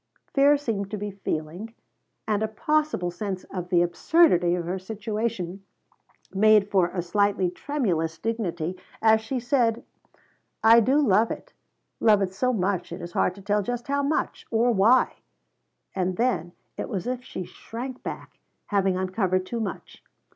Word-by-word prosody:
Fear 285 +1 +5
seemed 220 -8 -3
to 210 - -4
be 205 0 -4
feeling, 190 +3 -5 0.5
and 210 -1 +1
a 220 - +1
possible 300 -5 0
sense 190 0 -4
of 180 -2 -4
the 175 -2 +4
absurdity 175 - +3
of 175 -1 -3
her 185 +2 -3
situation 200 -2 -4 0.7
made 210 0 +4
for 185 -3 +4
a 175 0 -4
slightly 195 0 +1
tremulous 180 - -1
dignity 180 -5 -2 0.2
as 220 0 +4
she 250 +4 -3
said: 240 -2 +1 0.8
"I 225 +1 +8
do 255 +5 +3
love 225 -6 +4
it. - - -7 0.5
Love 210 -3 +4
it 185 -1 -3
so 255 +6 +1
much 190 -5 -1
it 170 - -6
is 175 -1 -7
hard 180 - +1
to 200 - -13
tell 205 +1 +1
just 245 +4 -4
how 280 0 +1
much 285 +2 -2
or 235 +2 +3
why." 225 +4 +4 0.8
And 185 -1 -1
then 205 -9 0 0.2
it - - -4
was 195 -1 -3
as 250 0 -2
if - - -22
she 185 - -6
shrank 245 +7 -8
back, - - -8 0.3
having 195 -3 +2
uncovered 185 0 0
too 235 +5 -4
much. 200 -6 -6
205 Hz, 160 wpm, -25 LUFS, 185-235 Hz, 0.8 s, I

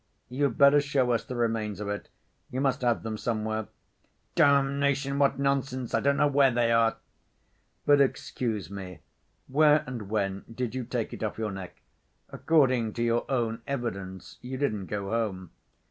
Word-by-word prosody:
"You'd 135 -1 0
better 140 +1 +6
show 140 -3 +1
us 115 - +1
the 125 - -7
remains 110 -4 -1
of 105 - -4
it. 105 0 -4 0.4
You 130 - -4
must 135 -2 +1
have 120 -2 +1
them 110 -1 -4
somewhere." 110 -2 -2 0.7
"Damnation, 140 0 +2
what 140 -1 +3
nonsense! 135 -2 -1
I - - +3
don't 140 0 +2
know - - +4
where 140 -1 +4
they 120 -1 +1
are." 115 -1 +3 0.9
"But 145 -1 +5
excuse 110 - -1
me: 95 -3 -8 0.5
where 150 +2 +4
and 120 -6 -6
when 100 -2 -1
did 120 0 -3
you 130 -2 -3
take 120 -2 -3
it - - -8
off 110 -2 -3
your 110 -2 -2
neck? 95 -2 -9 0.5
According 130 -8 +2
to 120 - -2
your 120 0 0
own 115 -3 -1
evidence 100 -8 -5
you 130 +1 -5
didn't 105 -9 -1
go 100 -1 -4
home." 100 -6 -2
120 Hz, 165 wpm, -28 LUFS, 110-140 Hz, 0.9 s, better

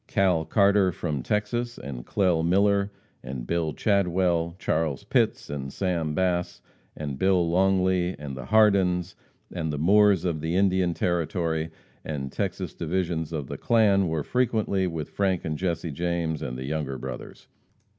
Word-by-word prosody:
Cal 90 -5 +2
Carter 100 +1 +3
from 75 -5 -3
Texas, 120 - -2
and 65 -3 -7
Clell 90 -5 +2
Miller, 100 +3 +2 0.3
and 65 -1 -6
Bill 85 +1 -1
Chadwell, 90 -3 +1
Charles 80 -6 -1
Pitts, - - +1
and 70 -2 -5
Sam 85 -5 -1
Bass, 90 -2 0 0.4
and 70 -3 -5
Bill 95 -3 +3
Longley, 95 0 +2
and 70 -2 -6
the 65 -2 -7
Hardins 95 - +3 0.4
and 80 -3 -2
the 75 - -3
Moores 100 +3 +4
of 80 -4 -1
the 80 +3 -1
Indian 95 -2 +2
Territory 85 -2 -1 0.3
and 70 -3 -4
Texas 95 -2 -3
divisions 85 -2 -2
of 75 -4 -3
the - - -7
clan 100 -5 +3
were 80 -2 -1
frequently 110 - 0
with 80 -4 -5
Frank 95 -3 0
and 80 -1 -2
Jesse 85 -1 -2
James 85 0 -2
and 60 0 -4
the 65 - -5
Younger 70 -2 -3
Brothers. 65 0 -8
85 Hz, 150 wpm, -26 LUFS, 80-95 Hz, 0.4 s, Moores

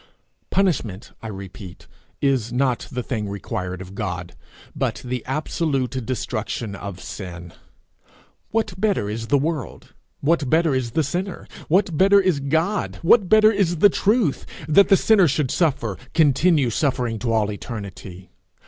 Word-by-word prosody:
Punishment, 130 - 0
I 115 - -6
repeat, 95 -2 -9 0.4
is 130 -5 +1
not 125 -1 0
the 125 -1 -3
thing 110 -5 -3
required 90 -2 -4
of 95 +1 -12
God, 90 -4 -4 0.4
but - - -2
the 125 -1 -3
absolute 135 -2 -1
destruction 110 -4 -3
of 100 -2 -7
sin. 85 -4 -8 1.0
What 220 -4 -1
better 195 - +1
is 115 +1 -5
the 145 - +3
world, 150 - -4 0.3
what 145 -2 +1
better 160 -1 +3
is 125 -3 -2
the 160 - +2
sinner, 180 +7 -4 0.2
what 180 0 +2
better 200 +1 +6
is 185 -6 +2
God, 160 +9 -1
what 190 +2 +5
better 215 0 +6
is 190 -5 +1
the 205 +6 +6
truth, 205 - +1 0.2
that 175 +6 +5
the 195 - +7
sinner 200 -4 +4
should 145 -2 0
suffer 135 - 0 0.2
continue 150 -3 +3
suffering 125 -4 -1
to 120 0 -2
all 110 -2 +1
eternity? 100 -4 -8
130 Hz, 145 wpm, -22 LUFS, 105-170 Hz, 1.0 s, the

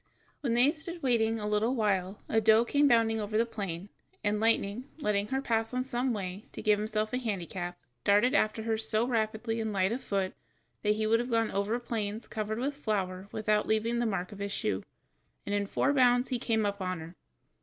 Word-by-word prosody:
When 245 -5 0
they 240 - +5
had 290 - +3
stood 340 +1 -7
waiting 225 -3 +2
a 210 - -3
little 215 +4 +1
while 200 -3 0
a 225 - +2
doe 220 +2 +5
came 285 +4 +3
bounding 225 -3 +3
over 210 +1 -1
the 230 - +3
plain, 200 -5 -5 0.3
and 210 0 +1
Lightning, 225 +1 +1
letting 210 -8 0
her 265 +2 -1
pass 225 -1 0
on 255 - +1
some 255 0 -1
way, 195 -2 -4
to - - -6
give 210 -1 +4
himself 215 +1 -1
a 250 - +1
handicap, 180 -5 -4 0.3
darted 210 +6 +4
after 215 -4 +2
her 220 -1 0
so 220 +1 +1
rapidly 225 -1 -1
and 220 -1 -2
light 190 0 +1
of 250 +3 -3
foot 195 -4 -1 0.5
that 210 0 +2
he 215 0 -1
would 225 +1 +3
have 245 +1 -2
gone 230 -2 +1
over 200 +4 0
plains 220 -2 -4
covered 215 0 -3
with 270 +4 -1
flour 195 -8 -2
without 215 -1 +1
leaving 225 +2 +1
the 240 - +1
mark 185 -4 -2
of 205 - -10
his 200 0 -3
shoe, - - -1 0.6
and 200 - -2
in 200 0 0
four 275 - +1
bounds 245 -2 +4
he 250 - -1
came 220 -2 +1
up 200 0 -1
with 185 -1 -2
her. 165 +2 -9
220 Hz, 215 wpm, -30 LUFS, 205-235 Hz, 0.6 s, they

